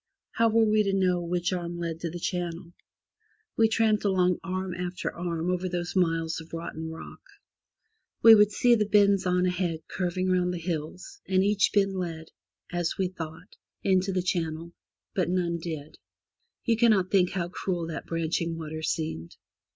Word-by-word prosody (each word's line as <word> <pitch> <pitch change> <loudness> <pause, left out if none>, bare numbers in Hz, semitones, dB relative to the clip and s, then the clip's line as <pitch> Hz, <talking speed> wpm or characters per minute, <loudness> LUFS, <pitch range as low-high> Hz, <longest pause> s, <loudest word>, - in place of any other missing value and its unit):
How 230 0 +3
were 225 0 +4
we 215 0 +3
to 200 -2 0
know 185 -2 +2
which 175 +2 -1
arm 175 -1 -4
led 165 -1 -4
to 170 - -3
the 175 - -6
channel? 170 -1 -4 0.8
We 225 - +4
tramped 220 -1 +2
along 185 -3 +2
arm 185 0 -3
after 180 0 -4
arm 170 0 -2
over 180 0 -1
those 175 +1 -3
miles 165 -3 +1
of 160 - -15
rotten 160 -1 -5
rock. 160 - -9 1.0
We 225 - +11
would 210 -1 +6
see 245 +3 +4
the 215 -3 +2
bends 200 -2 +4
on 180 0 +2
ahead 175 -3 -1
curving 185 0 -2
round 180 -1 +1
the - - -3
hills, 165 0 -5
and 190 0 +3
each 205 0 +3
bend 195 -1 +2
led, 165 -4 -5 0.4
as 175 -1 -1
we 190 -2 0
thought, 165 0 -9 0.3
into 190 0 +2
the 185 -1 0
channel, 170 -2 -2 0.4
but 185 -3 0
none 175 -2 0
did. 155 -3 -7 0.7
You 230 -2 +2
cannot 215 -6 +3
think 185 -3 +4
how 175 -2 -2
cruel 180 -2 -3
that 165 -1 -6
branching 165 0 -1
water 155 -1 -6
seemed. 155 - -3
180 Hz, 170 wpm, -27 LUFS, 165-190 Hz, 1.0 s, We